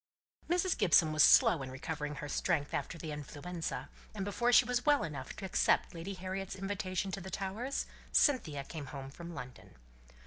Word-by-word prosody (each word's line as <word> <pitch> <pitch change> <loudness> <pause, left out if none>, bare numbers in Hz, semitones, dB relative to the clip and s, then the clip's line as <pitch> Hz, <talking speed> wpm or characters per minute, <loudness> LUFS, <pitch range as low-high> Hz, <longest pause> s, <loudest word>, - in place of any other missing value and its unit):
Mrs. 360 +1 +2
Gibson 165 -3 +4
was 155 - +3
slow 155 +1 +7
in 130 - -5
recovering 150 +2 -4
her 145 +1 -6
strength 145 0 0
after 170 - -3
the 160 -1 -6
influenza, 150 +4 -5 0.3
and 195 -2 -3
before 240 +4 +1
she 245 0 +7
was 245 0 0
well 295 -1 +4
enough 145 -5 -6
to 195 - -6
accept 190 - +2
Lady 175 +4 -6
Harriet's 190 +1 -4
invitation 195 -1 -2
to 195 - -4
the 190 - -7
Towers, 210 +9 -3 0.3
Cynthia 170 - +3
came 145 -1 -7
home 135 0 -7
from 170 +3 -9
London. 125 - -10
175 Hz, 175 wpm, -33 LUFS, 150-195 Hz, 0.3 s, slow